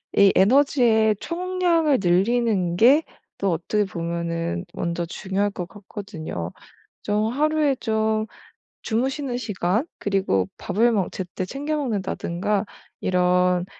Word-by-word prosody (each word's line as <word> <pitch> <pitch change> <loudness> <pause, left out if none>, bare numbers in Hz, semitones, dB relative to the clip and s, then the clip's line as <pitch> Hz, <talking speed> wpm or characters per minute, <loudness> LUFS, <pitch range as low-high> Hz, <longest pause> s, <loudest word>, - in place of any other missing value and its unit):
이 200 -1 +6
에너지의 225 -1 +4
총량을 345 -4 +1
늘리는 190 0 +2
게 265 - +6 0.3
또 195 -1 0
어떻게 205 +5 0
보면은 170 - -3
먼저 170 0 -2
중요할 195 +4 -2
것 180 -3 -6
같거든요. 175 - -7 0.5
좀 210 +2 0
하루에 305 0 +2
좀 220 -2 0 0.6
주무시는 260 +2 -1
시간 210 - -1
그리고 190 - +1
밥을 225 +5 +2
뭐 200 -5 0
제때 185 0 -5
챙겨 285 +9 -3
먹는다든가 205 -5 -1 0.4
이런 180 0 +2
205 Hz, 250 characters per minute, -23 LUFS, 180-245 Hz, 0.6 s, 이